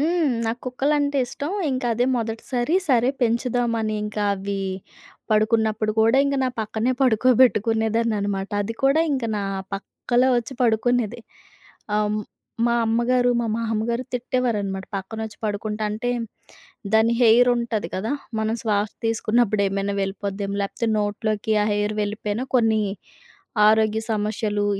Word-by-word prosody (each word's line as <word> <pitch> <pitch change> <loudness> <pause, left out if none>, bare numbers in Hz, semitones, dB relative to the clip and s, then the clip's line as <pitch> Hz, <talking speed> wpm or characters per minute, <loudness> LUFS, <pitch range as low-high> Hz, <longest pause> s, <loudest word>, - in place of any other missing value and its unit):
హ్మ్. 330 0 +2 0.2
నాకుక్కలంటే 275 +4 0
ఇష్టం. 280 +4 -5 0.2
ఇంకదే 245 -2 0
మొదటిసారి. 240 +6 -2
సరే, 245 -1 +4
పెంచుదామని 235 -2 0
ఇంకవి 200 -2 -2 0.7
పడుకున్నప్పుడు 215 0 +2
కూడా 225 +4 +4
ఇంక 280 0 0
నా - - +1
పక్కనే 220 +3 -1
పడుకోబెట్టుకునేదాన్ననమాట. 220 -4 +2
అది 225 +3 -4
కూడా 275 +4 +4
ఇంక 260 -4 -1
నా 205 - -2 0.3
పక్కలో 245 +5 0
వచ్చి 240 +3 -3
పడుకునేది. 240 0 +1 0.8
అం 210 0 +1 0.5
మా 235 - +2
అమ్మగారు, 245 +2 +2
మా 230 - -1
మామ్మగారు 230 +1 -1
తిట్టేవారనమాట, 230 -6 -1
పక్కనోచ్చి 220 +2 -6
పడుకుంటే 210 +1 -3
అంటే, 230 +4 -2 0.8
దాని 225 +1 +4
హెయిరుంటది 235 -4 +3
కదా! 220 +8 -2 0.3
మనం 220 +1 0
శ్వాస 210 -1 0 0.2
తీసుకున్నప్పుడు 220 -2 +1
ఏమైనా 195 +1 -2
వెళ్ళిపోద్దేమో 200 +1 -3
లేకపోతే 225 +3 -2
నోట్లోకి 215 +1 -1
ఆ - - 0
హెయిర్ 205 +1 0
వెళ్ళిపోయినా, 210 +3 -3
కొన్ని 220 -2 +3 0.9
ఆరోగ్య 220 0 +3
సమశ్శలు, 210 -1 -1
225 Hz, 110 wpm, -23 LUFS, 210-245 Hz, 0.9 s, సరే